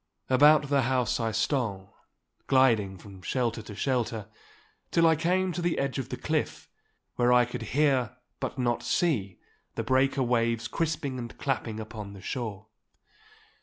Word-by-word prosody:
About 145 +2 +6
the 140 -1 +3
house 125 -1 +1
I 115 -1 0
stole, 110 -4 -1 0.5
gliding 115 -8 +3
from 95 -1 -13
shelter 120 0 -1
to 105 -1 -10
shelter, 115 -4 -1 0.6
till 165 - +3
I 160 0 +5
came 180 +4 +1
to 175 - -4
the 175 -1 0
edge 140 0 -1
of 130 - -5
the - - -4
cliff, - - -2 0.5
where 120 0 +3
I 125 0 +6
could 120 +1 -6 0.2
hear, 130 -5 +2 0.2
but - - -4
not 120 -2 0
see, 105 - 0 0.4
the - - -2
breaker 135 +1 +2
waves 115 -2 +1
crisping 155 -5 -2
and 120 -1 -7
clapping 120 -5 -2
upon 110 -2 -7
the 100 - -10
shore. 110 -3 -4
125 Hz, 155 wpm, -28 LUFS, 110-140 Hz, 0.6 s, About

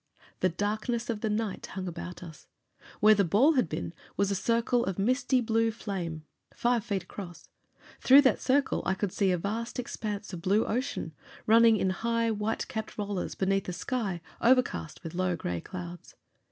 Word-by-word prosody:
The 185 - +3
darkness 215 +6 -2
of 215 -2 -5
the 220 - 0
night 210 -1 -2
hung 190 -1 -5
about 175 +1 -7
us. 160 -4 -12 0.5
Where 215 +1 +8
the 200 -1 +3
ball 220 - +4
had 250 - +1
been 85 -1 -4 0.2
was 200 0 +2
a - - +2
circle 235 +4 +1
of 190 -2 -3
misty 255 +5 +2
blue 225 0 +2
flame, 180 -8 -5 0.3
five 240 -2 +1
feet 200 -5 -2
across. 175 -2 -10 0.5
Through 270 +2 +8
that 265 - +3
circle 275 +1 +2
I 190 - 0
could 195 -1 -2
see 195 0 +1
a 180 - +2
vast 220 +6 -3
expanse 210 -5 -4
of 170 - -5
blue 200 +5 +2
ocean, 250 - -2 0.3
running 225 0 +6
in 190 -1 +1
high, 230 +3 0
white 215 +1 -2
capped 220 -1 -5
rollers, 205 -3 -3
beneath 195 0 0
a - - -3
sky 195 -3 -2 0.2
overcast 245 - +2
with 165 - -6
low 185 0 0
gray 90 - -3
clouds. 175 -2 -8
205 Hz, 180 wpm, -29 LUFS, 185-230 Hz, 0.5 s, Where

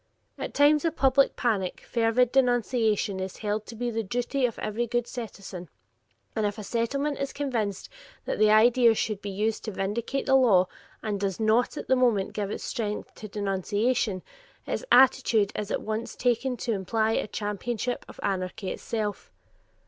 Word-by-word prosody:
At - - -5
times 290 +1 +5
of 330 -1 0
public 270 0 +3
panic, 205 -7 -1
fervid 235 +1 +2
denunciation 235 -6 +2
is 190 0 -5
held 210 0 -2
to 230 - -8
be 240 +1 -2
the 225 0 -1
duty 245 +5 0
of 230 - -8
every 230 +3 -2
good 240 +1 0
citizen, 195 - -7 0.7
and 220 - 0
if 205 +1 -1
a 215 - -6
Settlement 275 +7 -1
is 275 0 -2
convinced 230 -9 -2 0.4
that - - -2
the 215 0 +5
incident 230 +1 +5
should 215 -3 -1
be 205 - -5
used 210 +3 -1
to 220 - -3
vindicate 215 +8 -2
the 265 - +2
law 215 -9 +5 0.4
and 210 -2 -2
does 195 0 -2
not 220 +2 +2
at - - -5
the 260 - +4
moment 235 -6 +2
give 205 -2 -2
its - - -5
strength 210 -4 -4
to 215 - -9
denunciation, 205 +1 -1 0.4
its - - -3
attitude 250 -5 +5
is 210 -1 -3
at - - -2
once 220 +1 -3
taken 250 +1 0
to 235 - -2
imply 220 +3 0
a 225 - 0
championship 215 +4 -3
of - - -13
anarchy 185 0 -2
itself. 215 -3 -4
225 Hz, 170 wpm, -27 LUFS, 205-245 Hz, 0.7 s, times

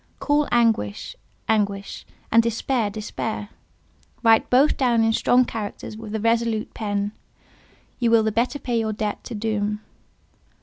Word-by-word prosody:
Call 290 +2 +1
anguish—anguish, 205 - -1 0.2
and 230 - +6
despair—despair; 220 -2 -2 0.7
write 225 -1 +4
both 270 +4 +4
down 240 -4 +2
in 225 0 +2
strong 250 +2 +3
characters 215 -1 -6
with 220 -1 -7
a - - -1
resolute 230 0 0
pen: 205 -1 -2 0.9
you 240 -2 +2
will 230 -1 +5
the 220 - +1
better 240 +6 0
pay 240 -4 -1
your 220 -1 -1
debt 210 0 -3
to 235 - -6
Doom. 210 -1 -1
225 Hz, 130 wpm, -23 LUFS, 210-235 Hz, 0.9 s, and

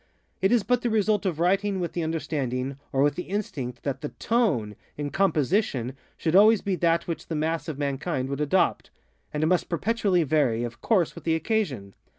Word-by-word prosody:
It 190 - +3
is 240 -4 +4
but 245 -1 +1
the 240 - 0
result 210 -2 +1
of 165 -4 -2
writing 195 +3 +1
with 175 -2 -3
the 175 - -2
understanding, 140 -5 -2
or 135 0 +2
with 145 - +3
the 180 - -6
instinct, 135 - -4
that 135 -1 -3
_the 150 - -5
tone, 160 - +1 0.2
_in 145 -1 -4
composition, 160 - +1 0.2
should 165 +1 0
always 215 +2 +7
be 195 -2 0
that 170 -1 +1
which 170 - -4
the 165 - -3
mass 155 0 -1
of 155 -4 -4
mankind 140 -1 -2
would 140 0 -3
adoptŌĆöand 150 -1 -1
must 180 +1 +1
perpetually 190 0 +1
vary, 135 -6 +1
of 120 0 -6
course, 190 -8 +2
with - - -11
the 165 -1 +1
occasion. 160 - -1
165 Hz, 185 wpm, -26 LUFS, 140-195 Hz, 0.2 s, always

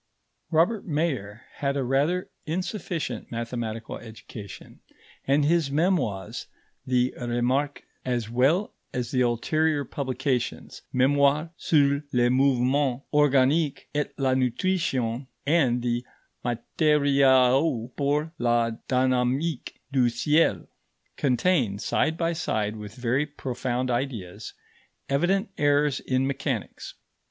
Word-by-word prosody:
Robert 175 +7 +2
Mayer 135 - -2
had 140 0 -1
a 135 - 0
rather 145 +8 0 0.2
insufficient 165 - -3
mathematical 115 -1 -4
education, 110 -2 -11 0.5
and 140 +2 +3
his 165 -2 +2
Memoirs, 140 - -1 0.4
the 125 0 +2
Remarques, 125 +4 -1 0.2
as 120 -3 -1
well 135 - +2 0.2
as 125 -1 -2
the 130 - +1
ulterior 145 +5 +1
publications, 130 -1 -3
Mémoire 140 +4 +3
sur 140 -4 +2
le 120 0 +3
mouvement 130 0 +2
organique 145 +1 +3
et 145 -1 -1
la 135 -2 +1
nutrition 130 -2 0 0.2
and 135 -6 +2
the 120 0 0 0.4
Matériaux 130 -1 +2
pour 150 +2 0
la 120 -1 +2 0.2
dynamique 130 +3 0
du 130 -3 +3
ciel, 135 - +2 0.5
contain, 130 - +1
side 160 +9 0
by 170 0 0
side 110 -10 -1
with 105 -1 -9
very 125 +4 0
profound 130 -3 -3
ideas, 110 -6 -4 0.5
evident 190 +9 +1
errors 145 -1 +3
in 130 0 0
mechanics. 135 -4 -4
135 Hz, 105 wpm, -26 LUFS, 120-150 Hz, 0.5 s, and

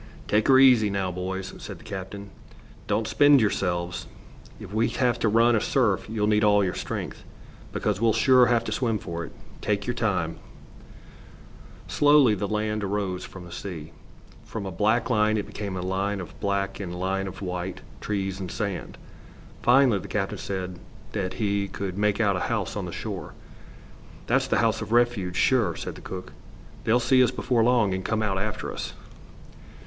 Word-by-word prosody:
"Take 105 +1 +2
her 130 - +7
easy, 125 -5 +6
now, 100 -2 -1
boys," 95 +1 -4
said - - -8
the - - -16
captain. 100 -1 -7 0.6
"Don't 110 0 0
spend 145 +4 +6
yourselves. 90 -5 -1 0.5
If 100 - -9
we 110 +2 +2
have 125 -4 0
to 110 - +2
run 115 +2 +4
a 110 - +2
surf 115 -6 +1
you'll 110 -2 0
need 105 0 +3
all 105 -1 +5
your 90 - -1
strength, - - -5 0.5
because 105 -1 -1
we'll 115 -1 +4
sure 125 +3 +5
have 120 -1 +2
to - - -4
swim 115 -4 0
for 85 -3 -5
it. - - -11 0.3
Take 100 -1 -1
your 125 - -1
time." 100 -9 -1 1.5
Slowly 145 -5 +5
the 100 0 -2
land 105 0 -1
arose 95 -2 -2
from 95 -2 -10
the 85 - -12
sea. 85 -4 -7 0.5
From 110 -3 -6
a 95 - -4
black 110 +8 +1
line 110 -1 +3
it 105 - -2
became 100 -2 -5
a - - -3
line 95 +2 -1
of 90 - -9
black 100 -1 -1
and 90 -4 -5
a - - -6
line 95 +1 -1
of 95 - -8
white, 90 0 -4 0.2
trees 95 -2 -2
and 95 -2 -5
sand. 100 0 -4 0.6
Finally, 125 -4 +5
the 100 - -9
captain 95 0 -2
said 90 0 -4 0.3
that 95 -3 -2
he 100 -2 0
could 95 -1 -5
make 105 +1 +1
out 100 -4 +3
a - - -1
house - - -2
on - - -3
the - - -6
shore. - - -6 0.9
"That's - - +2
the - - +1
house - - +1
of - - -6
refuge, 120 -7 +2
sure," 125 +1 +2
said - - -5
the - - -12
cook. 95 0 -7 0.5
"They'll 115 +3 +4
see 130 +1 +4
us 125 - +3
before 120 -3 +1
long, 115 -5 +3
and 95 0 -3
come 110 +2 0
out 95 -2 0
after 105 +1 -3
us." - - -5
105 Hz, 185 wpm, -26 LUFS, 95-115 Hz, 1.5 s, her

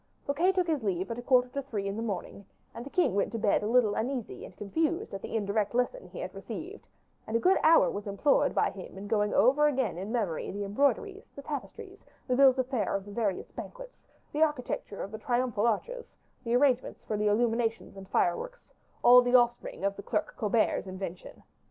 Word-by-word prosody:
Fouquet 325 +7 +2
took 365 -1 +1
his 315 -5 -1
leave 190 0 -2
at 230 - -4
a - - -5
quarter 250 0 +3
to 280 +2 -4
three 210 -7 -4
in 195 0 -3
the 225 - -4
morning, 200 -2 -5 0.3
and 235 - -7
the 275 - -9
king 355 - +2
went 200 - 0
to - - -1
bed 205 -2 +2
a 210 - -2
little 230 -2 +3
uneasy 245 +1 -3
and 180 - -12
confused 320 - -2
at 195 - -5
the - - -6
indirect 205 +1 -1
lesson 250 - -1
he - - -12
had - - -5
received; - - -8 0.4
and 225 - +1
a - - -1
good 370 +8 +4
hour 325 +1 +6
was 205 +1 -6
employed 200 +9 +2
by - - +2
him - - -10
in 195 - -7
going 210 -1 +1
over 280 +5 +4
again 260 - -1
in 195 +4 -5
memory 210 -9 -2
the 205 +1 -4
embroideries, 285 - -1
the 280 - -9
tapestries, 385 - -7 0.2
the 250 - +1
bills 265 -1 +6
of 260 - +1
fare 245 -8 -1
of 195 -1 -3
the 205 - -10
various 200 -3 -2
banquets, - - -10 0.2
the 300 - -2
architecture 295 -9 -1
of 200 - -7
the 220 - -7
triumphal 240 -4 0
arches, 475 - -3 0.3
the 235 -1 0
arrangements 255 -1 +1
for 215 - -2
the 210 0 0
illuminations 225 +1 0
and 195 -1 -11
fireworks, - - -1 0.3
all 250 +1 +9
the 245 0 +2
offspring 240 -5 +2
of 200 0 0
the - - -8
"Clerk 210 +1 -2
Colbert's" 215 -2 +1
invention. 185 -1 -7
235 Hz, 215 wpm, -29 LUFS, 205-280 Hz, 0.4 s, all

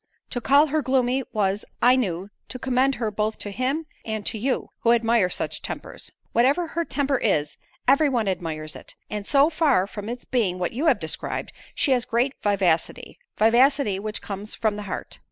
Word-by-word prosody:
To 245 - -2
call 280 +5 +5
her 310 +1 0
gloomy, 260 0 +1
was, 200 -1 0 0.2
I 250 +1 +6
knew, 195 -5 -2 0.2
to - - -5
commend 260 +1 +1
her 225 -3 -2
both 215 +1 -1
to 205 - -6
him 265 +9 -1 0.2
and 220 -2 -4
to 220 - -2
you, 260 +4 -1
who 235 - +4
admire 230 -4 +3
such - - -3
tempers." - - -6 0.2
"Whatever 280 +9 +2
her 335 +1 -1
temper 280 -4 0
is, 150 -9 0 0.3
every 280 +3 +5
one 235 -5 0
admires 160 -4 -3
it; - - -10 0.2
and 210 -1 -4
so 285 +3 +4
far 290 - +3
from 205 +1 -7
its 240 +1 -6
being 210 -8 0
what 180 -1 -2
you 285 +8 0
have - - +5
described, - - -4 0.2
she 280 - +2
has 250 -2 +2
great 245 +4 +1
vivacity; 190 - 0 0.2
vivacity 235 -1 +4
which 215 +1 -4
comes 205 +1 -5
from 220 -2 0
the 210 - -5
heart." - - -6
235 Hz, 190 wpm, -24 LUFS, 205-270 Hz, 0.3 s, I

